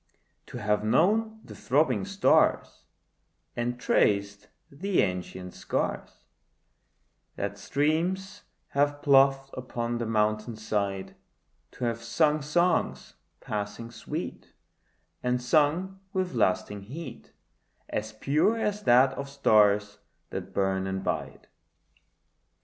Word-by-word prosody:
To - - -8
have 105 -2 0
known 220 - +2
the - - -10
throbbing 150 +8 +1
stars, 200 -1 +2 0.7
And 120 +1 -2
traced 100 -3 +1 0.2
the 185 +7 +1
ancient 90 -1 -4
scars - - -3 1.1
That 100 0 -4
streams 175 - -1 0.3
have 145 +1 0
ploughed 135 -1 +4
upon 120 -2 -3
the 115 - -2
mountain 110 +1 0
side; 100 -3 -3 0.6
To - - -8
have 115 -1 -2
sung 150 +6 +2
songs 175 +5 0 0.3
passing 105 +2 -5
sweet, 110 - -6 0.7
And 125 0 0
sung 155 +9 +1
with 185 -4 -1
lasting 105 -2 0
heat 145 +12 -9 0.6
As 110 +1 -3
pure 150 - +1
as 210 -2 -1
that 130 +2 +5
of 140 +1 -6
stars 105 -6 +3 0.3
that - - -5
burn 95 -1 0
and 95 0 -3
bide. - - -4
125 Hz, 105 wpm, -28 LUFS, 105-155 Hz, 1.1 s, that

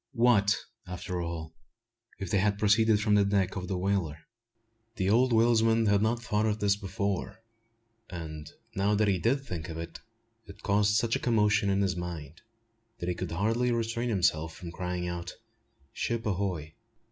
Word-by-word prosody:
What, 115 -4 +4 0.3
after 90 0 -4
all, 80 -2 -5 0.6
if 95 -4 -5
they 100 - +3
had 100 +1 +1
proceeded 105 +1 +4
from 105 0 +2
the 105 -1 +5
decks 100 -1 +1
of 90 -2 -4
the 95 - -2
whaler? 90 -5 0 0.8
The 95 -2 +1
old 125 +3 +4
whalesman 115 0 +4
had 100 -1 +3
not 115 +2 0
thought 105 -2 +1
of 105 -1 0
this 100 -1 +3
before; 100 +1 -3 0.7
and, 80 -3 -7 0.2
now 100 0 +1
that 105 +1 +2
he 95 -2 +2
did 135 +8 +1
think 85 -6 -5
of 80 - -6
it, 85 0 -7 0.5
it 100 +1 -13
caused 105 0 +3
such 115 +1 +2
a - - -1
commotion 105 -3 +2
in 100 0 +2
his 95 -2 0
mind, 85 -3 -6 0.6
that 85 - -3
he - - +1
could 90 0 -5
hardly 115 +7 +1
restrain 115 +1 -1
himself 85 -6 +1
from 85 -2 -8
crying 90 0 -3
out 85 0 -5 0.6
"Ship 115 0 -2
ahoy!" 90 -6 -2
100 Hz, 170 wpm, -29 LUFS, 90-110 Hz, 0.8 s, the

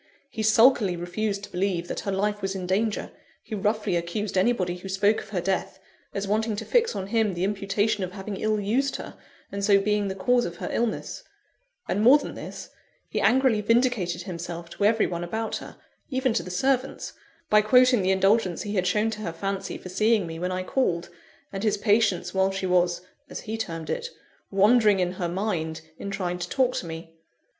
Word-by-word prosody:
He 220 - -4
sulkily 220 -3 +5
refused 200 +4 -3
to - - -9
believe 180 -2 -1
that - - -4
her 200 - -3
life 205 +2 -1
was 195 0 -2
in 185 -1 -4
danger; 210 +4 -1 0.3
he - - -9
roughly 210 -1 0
accused 170 +5 -2
anybody 185 -3 +1
who 190 +2 -9
spoke 200 +3 +2
of - - -13
her 190 -4 -2
death, 190 +1 -2 0.3
as 200 0 -3
wanting 215 +1 0
to - - -5
fix 470 -1 +2
on 195 - -3
him 210 -2 +1
the 175 - -2
imputation 200 +1 0
of 185 0 -5
having 195 0 -6
ill 215 +1 0
used 245 +7 0
her, - - -7 0.4
and 200 0 -4
so 200 0 +5
being 210 0 +1
the 190 - -3
cause 245 +6 +2
of 170 - -4
her - - -5
illness; 235 -2 -2 0.7
and 205 - 0
more 250 +6 +8
than - - -6
this, - - -8 0.4
he - - -1
angrily 255 -4 +3
vindicated 215 -6 +1
himself 170 -1 -6
to 200 - -1
every 220 +1 +4
one 175 -1 -3
about 220 +6 -3
her - - -10 0.3
even 260 -3 +1
to - - +1
the - - -8
servants 260 +8 -1 0.4
by 210 0 +7
quoting 250 +1 +5
the 185 - +1
indulgence 190 -1 +2
he 205 - -4
had 185 -3 +1
shown 210 +4 +1
to 215 -1 -6
her 175 - -3
fancy 195 +3 -4
for 185 - -10
seeing 215 +1 +2
me 165 -1 -6
when 180 +1 -2
I 185 0 -2
called, 180 -6 0 0.4
and 195 - -3
his 215 -1 +1
patience 205 -5 +2
while 190 0 +3
she 195 0 -3
was 175 -1 +2 0.3
(as - - -6
he 220 - -4
termed 165 -8 -4
it) 480 -1 -3 0.4
wandering 210 +1 +4
in 180 -1 +1
her 180 -2 -3
mind 175 -4 -2 0.2
in 200 - -5
trying 180 -3 -3
to 175 0 -4
talk 255 -2 +2
to 170 - -4
me. 165 0 -8
200 Hz, 205 wpm, -26 LUFS, 180-220 Hz, 0.7 s, more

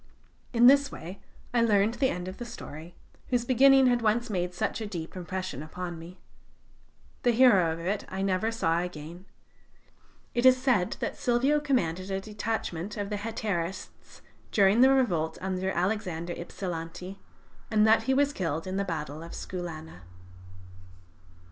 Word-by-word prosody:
In 240 -1 +4
this 280 +2 +6
way 185 +5 -9 0.3
I 240 - +3
learned 210 -1 +3
the 265 +1 +1
end 180 -4 -4
of 185 - -7
the - - -4
story, 170 -8 -9 0.3
whose 245 -2 0
beginning 270 +2 +6
had 245 -1 +3
once 225 +1 +1
made 180 -2 -1
such 215 +5 -2
a 215 - -3
deep 170 -5 -6
impression 185 -3 -5
upon 175 +2 -6
me. 170 +3 -11 1.0
The 245 - +2
hero 225 -9 +5
of 160 - -5
it 190 +5 -2
I 190 +1 -3
never 195 +3 0
saw 165 -7 +1
again. 175 +1 -7 1.1
It 240 - 0
is 255 0 +7
said 250 -9 +1
that - - -3
Silvio 260 +5 +2
commanded 190 - -1
a 190 0 -1
detachment 210 -2 -4
of 200 -1 -3
Hetairists 205 -4 -4 0.3
during 200 +3 +4
the 260 - +8
revolt 175 -13 +1
under 190 0 -2
Alexander 180 -3 -2
Ipsilanti, 175 +1 -6 0.5
and 215 -1 +4
that 220 0 +5
he 265 - +4
was 285 +1 +2
killed 165 - -2
in 185 +1 -3
the 200 - +1
battle 155 -4 -4
of 165 0 -9
Skoulana. 160 - -7
195 Hz, 155 wpm, -28 LUFS, 175-235 Hz, 1.1 s, the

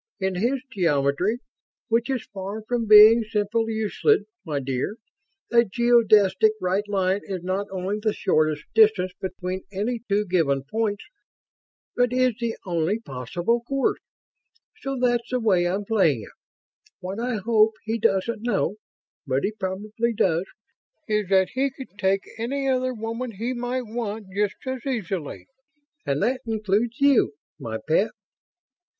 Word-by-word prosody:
In 190 -1 0
his 245 +8 0
geometry 165 - +1 0.5
which 230 +2 +1
is 260 -4 -2
far 200 +2 -5
from 230 0 -2
being 215 +2 +9
simple 220 +1 -1
Euclid, 220 -1 +1 0.2
my 150 -3 -2
dear 135 +8 -2 0.6
a 235 0 +6
geodesic 220 -3 +4
right 190 +3 0
line 195 0 +1
is 185 -3 -5
not 190 +2 -2
only 190 +2 -3
the 215 0 +1
shortest 155 -6 +1
distance 215 -4 +4
between 185 0 -4
any 215 +5 -2
two 205 +1 +2
given 160 -8 +1
points, 205 +6 -2 0.9
but 245 -1 +2
is 255 -1 +2
the 235 -1 -2
only 175 +2 0
possible 175 - -2
course. 270 +3 0 0.8
So 275 0 -4
that's 240 -1 +1
the 255 - 0
way 190 -6 +2
I'm 195 +3 -2
playing 170 - +2
it. - - -13 0.7
What 185 +3 -5
I 245 0 -1
hope 220 +1 +3
he 225 +1 -2
doesn't 210 +2 +1
know... 210 -3 0 0.5
but 130 +1 0
he 205 - 0
probably 215 +3 -3
does... 175 -2 +1 0.6
is 210 -3 0
that 190 -1 +4
he 270 +2 0
could 260 -6 -12
take 195 0 +1 0.2
any 270 +4 -2
other 255 -1 0
woman 230 +2 -4
he 230 +6 -3
might 245 +1 -2
want, 220 -1 -4
just 205 +1 0
as 260 -2 -4
easily. 195 - -4 0.6
And 140 +1 0
that 255 +1 0
includes 220 +3 0
you, 280 - +4 0.3
my 110 -1 -4
pet." 195 +7 +3
210 Hz, 145 wpm, -24 LUFS, 185-235 Hz, 0.9 s, being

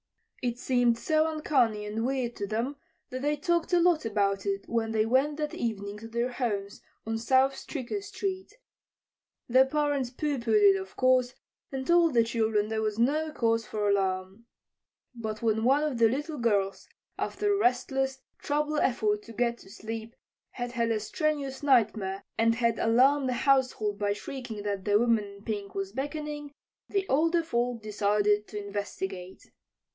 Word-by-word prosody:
It 240 -1 -1
seemed 245 -2 +2
so 315 +4 +1
uncanny 250 -9 +1
and 215 +2 -3
weird 255 -2 -1
to 200 - -3
them 235 +7 -2 0.3
that 255 0 -4
they 295 +2 +1
talked 340 +3 0
a 350 - +6
lot 340 -2 +3
about 200 -3 0
it 195 0 -2
when 225 -1 -1
they 220 -1 +2
went 270 +5 +2
that 300 -1 -3
evening 205 -3 -3
to 225 - -9
their 235 +2 -1
homes 205 -6 -3 0.2
on 225 0 -2
South 260 +3 +3
Stricker 280 - -5
street. 390 -1 -5 0.9
The 255 +2 +5
parents 290 -3 0
pooh 285 +2 -2
poohed 220 -3 +2
it, 195 - -2
of 190 0 -11
course, 255 -1 +3 0.4
and 265 -1 -4
told 340 -3 +4
the 230 - +6
children 220 -2 0
there 220 0 -1
was 215 -1 -1
no 300 +7 +1
cause 230 -5 0
for 210 -1 -1
alarm. 195 +2 -1 0.7
But 220 -2 -5
when 220 -1 +1
one 275 +5 +4
of 290 -6 -1
the 225 -1 +6
little 295 +4 -3
girls, 200 -4 0 0.3
after 415 0 0
a - - +2
restless, 265 0 0 0.2
troubled 300 +1 0
effort 215 -4 +1
to 230 - -10
get 235 +1 0
to - - -15
sleep, 225 +2 -7 0.4
had 245 -1 -4
had 235 -1 0
a 225 -1 +1
strenuous 280 +3 -2
nightmare, 215 -8 +2 0.2
and 230 0 +4
had 235 -1 +1
alarmed 260 +4 +4
the - - +1
household 255 -7 +2
by 205 -1 +1
shrieking 225 -1 -7
that 200 -2 -2
the 205 -1 +4
woman 230 -1 +3
in 200 0 -13
pink 205 -3 -4
was 195 0 -3
beckoning, 295 +3 -4 0.4
the 395 -1 -1
older 330 +4 +2
folk 240 -6 -1
decided 210 0 +1
to 210 - -7
investigate. 190 -2 -6
235 Hz, 170 wpm, -28 LUFS, 210-275 Hz, 0.9 s, a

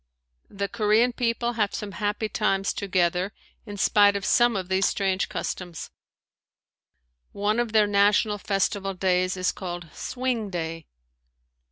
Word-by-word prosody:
The 200 0 -3
Korean 220 +3 +2
people 235 0 -1
have 210 -4 0
some 210 -1 -5
happy 210 +2 -2
times 195 -2 0
together 180 0 0 0.3
in 205 0 -7
spite 205 0 +4
of 200 0 -3
some 240 -1 +4
of 185 -2 -3
these 190 +1 +2
strange 195 -1 0
customs. 175 -3 -5 1.4
One 210 +3 0
of 240 -2 -1
their 215 -1 +5
national 205 +1 +3
festival 195 0 -1
days 185 0 +1
is 185 0 +1
called 175 -3 -7
"Swing 245 -4 -3
day." 165 -3 -5
200 Hz, 135 wpm, -25 LUFS, 185-215 Hz, 1.4 s, their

